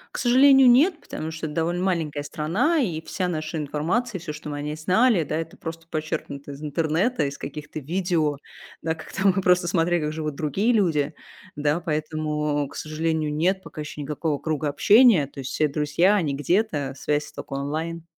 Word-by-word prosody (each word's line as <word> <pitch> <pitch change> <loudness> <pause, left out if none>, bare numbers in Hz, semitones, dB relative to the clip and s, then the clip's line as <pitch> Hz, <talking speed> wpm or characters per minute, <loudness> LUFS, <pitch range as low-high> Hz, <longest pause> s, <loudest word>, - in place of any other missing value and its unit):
К - - -2
сожалению, 265 +1 +6
нет, 315 +7 +4
потому 155 - -6
что 160 0 -5
эт 150 - -5
довольно 170 +2 -1
маленькая 160 -6 -1
страна. 205 - 0
И 170 -9 -1
вся 185 -2 -2
наша 155 -1 -3
информация, 170 - -1
всё, 160 -2 -6
что 150 0 -8
мы 145 - -4
о - - -4
ней 150 +1 -3
знали, 185 +4 +3
да, 150 - -3
это 165 0 -5
просто 165 0 -7
почерпнуто 150 -3 -4
из 140 +2 -9
интернета, 165 - 0
из 140 - -6
каких-то 150 +1 -7
видео, 160 -2 0 0.4
да. 160 0 -1
Как 155 - -12
там 195 -1 +3
мы 195 - +1
просто 180 -1 +3
смотрели, 175 -1 +1
как 150 0 -2
живут 155 -2 -4
другие 195 - +1
люди, 160 -9 +1 0.4
да. 150 +2 +1
Поэтому, 150 -2 -1
к - - -13
сожалению, 155 0 -1
нет 185 +5 +1
пока 155 - -8
еще 150 0 -7
никакого 150 0 -2
круга 155 -1 -1
общения. 205 - +5
То 140 -1 -9
есть 130 - -5
все 155 - +2
друзья, 150 +7 +2
они 160 -8 0
где-то, 145 - 0
связь 150 +2 -1
тока - - -8
онлайн. 155 +4 -3
160 Hz, 190 wpm, -24 LUFS, 150-180 Hz, 0.4 s, сожалению